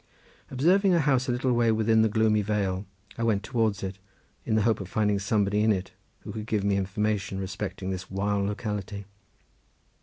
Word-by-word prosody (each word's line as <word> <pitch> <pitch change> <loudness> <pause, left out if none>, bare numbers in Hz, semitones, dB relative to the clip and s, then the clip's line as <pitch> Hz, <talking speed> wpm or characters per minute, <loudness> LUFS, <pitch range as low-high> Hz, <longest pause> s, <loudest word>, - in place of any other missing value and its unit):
Observing 180 +8 +3
a - - +3
house 130 -4 +2
a - - +3
little 125 +1 +1
way 120 -1 +3
within 110 0 +3
the 110 - +3
gloomy 110 0 +2
vale 100 -2 -1 0.3
I - - 0
went 105 -3 +1
towards 110 -5 0
it 95 0 -5 0.5
in 110 - +1
the 110 - +3
hope 115 0 +2
of 95 - -7
finding 105 -1 +1
somebody 100 0 +1
in 110 +1 +4
it 95 -2 -2 0.3
who - - -7
could 110 -1 -6
give 105 -3 0
me 100 0 +2
information 100 0 -1
respecting 95 0 -4
this 95 -1 -5
wild 100 +1 0
locality. 105 -1 -4
105 Hz, 185 wpm, -27 LUFS, 100-115 Hz, 0.5 s, in